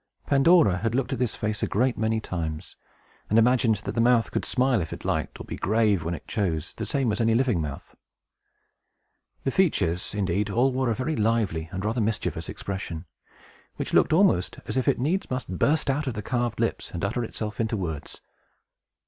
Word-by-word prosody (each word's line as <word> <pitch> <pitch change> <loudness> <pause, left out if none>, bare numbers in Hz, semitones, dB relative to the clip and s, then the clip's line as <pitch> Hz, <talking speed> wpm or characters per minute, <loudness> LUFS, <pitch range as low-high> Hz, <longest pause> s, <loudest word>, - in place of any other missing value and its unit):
Pandora 140 - +5
had 115 +4 -1
looked 135 +1 0
at - - -3
this 125 -3 0
face 105 0 -2
a - - +1
great 125 +4 +1
many 110 0 0
times, 80 -5 -5 0.5
and 110 - +3
imagined 115 -1 +4
that - - -3
the 115 - 0
mouth 120 -1 +3
could - - -2
smile 125 -4 +2
if 80 - -5
it - - -8
liked, - - -2
or - - -6
be - - -6
grave 105 -4 +2
when 85 +2 -2
it - - -12
chose, 90 -7 -2
the - - -4
same 135 -5 +1
as 105 - -1
any 115 0 +3
living 120 -8 +2
mouth. 75 -2 -7 1.5
The 135 - 0
features, 105 - +1
indeed, 100 +1 0
all 125 +6 +2
wore 130 -1 0
a 115 - +1
very 140 +6 -2
lively 105 - 0
and 95 +1 -4
rather 115 +2 0
mischievous 110 0 -2
expression, 95 -4 -5 0.7
which - - -4
looked - - +4
almost 160 - +3
as - - -4
if 130 - 0
it - - +3
needs 165 +10 -1
must 125 -8 -4
burst 155 +1 +2
out 140 +2 0
of 125 - -2
the 105 - -4
carved 120 0 -1
lips, - - -1
and 85 +2 -3
utter 120 +4 -1
itself 110 -1 -5
in 115 - +1
words. 90 -9 -4
110 Hz, 200 wpm, -26 LUFS, 95-130 Hz, 1.5 s, Pandora